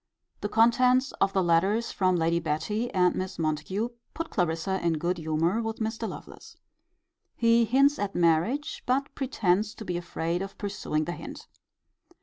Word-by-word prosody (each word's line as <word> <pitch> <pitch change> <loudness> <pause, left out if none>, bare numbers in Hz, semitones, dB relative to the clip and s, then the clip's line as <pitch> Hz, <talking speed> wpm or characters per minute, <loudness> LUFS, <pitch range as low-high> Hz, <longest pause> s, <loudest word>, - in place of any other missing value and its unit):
The 205 - -3
contents 250 +4 +4
of 195 - +3
the 190 -1 +1
letters 190 +7 +2
from 185 -1 +2
Lady 170 0 +1
Betty 170 +9 -2
and 180 -1 +3
Miss 185 0 -4
Montague 165 +8 -1 0.3
put 330 0 -4
Clarissa 175 +1 -1
in 170 -1 +2
good 175 +3 -1
humour 165 +7 0
with 225 0 -3
Mr. 220 0 -3
Lovelace. - - -11 0.8
He 230 0 +4
hints 275 +5 +3
at 205 -1 -3
marriage; 175 - +1
but 270 +3 0
pretends 215 -5 0
to 220 - -9
be 180 -2 -2
afraid 170 0 -3
of 195 0 -6
pursuing 195 -6 -2
the 175 - -3
hint. - - -8
195 Hz, 155 wpm, -27 LUFS, 170-230 Hz, 0.8 s, contents